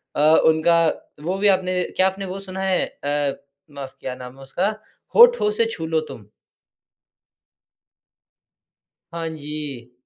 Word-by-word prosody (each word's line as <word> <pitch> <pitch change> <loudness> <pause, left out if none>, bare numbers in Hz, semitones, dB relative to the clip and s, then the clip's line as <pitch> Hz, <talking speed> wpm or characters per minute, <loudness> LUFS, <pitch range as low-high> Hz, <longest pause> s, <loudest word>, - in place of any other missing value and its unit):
अ, - - +1 0.2
उनका 165 +1 +4 0.4
वो 180 +4 -2
भी 205 +1 +2
आपने 185 -1 +2
क्या 185 - +5
आपने 195 +1 -4
वो 190 +1 -6
सुना 190 -1 -7
है? 190 -1 +1
अ, 145 -1 -3 0.3
माफ 140 -2 -8
क्या 130 - -5
नाम 125 0 -10
है 135 - -12
उसका? 175 +9 -1 0.5
होठों 475 - +6
से 220 +2 +1
छू 165 - -5
लो 160 0 +1
तुम। 105 - -11 2.9
हाँ 165 -1 -3
जी। 145 -5 -7
165 Hz, 135 wpm, -22 LUFS, 145-190 Hz, 2.9 s, होठों